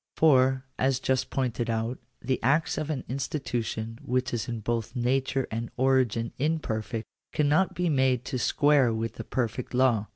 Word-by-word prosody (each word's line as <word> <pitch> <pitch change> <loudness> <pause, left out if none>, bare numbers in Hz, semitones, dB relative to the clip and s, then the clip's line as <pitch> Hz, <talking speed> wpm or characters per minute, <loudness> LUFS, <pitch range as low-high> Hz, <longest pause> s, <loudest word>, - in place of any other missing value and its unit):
For, 130 -3 +4
as 130 0 +2
just 130 -1 0
pointed 125 -3 -1
out, 115 +2 -1 0.2
the 130 +1 -1
acts 150 +4 +2
of 155 0 -3
an 150 -4 -2
institution 120 -4 -3
which 125 +1 -1
is 115 - -2
in 115 -2 -4
both 115 +2 -2
nature 130 +2 0
and 115 +1 -3
origin 125 -3 +2
imperfect, 120 -7 -1 0.3
cannot 150 +5 +2
be 180 0 0
made 130 -4 +2
to 130 -2 -2
square 145 -1 +4
with 115 0 -3
the - - -4
per 125 -3 0
fect 125 +3 -7
law. 120 -5 +3
130 Hz, 165 wpm, -27 LUFS, 115-135 Hz, 0.3 s, For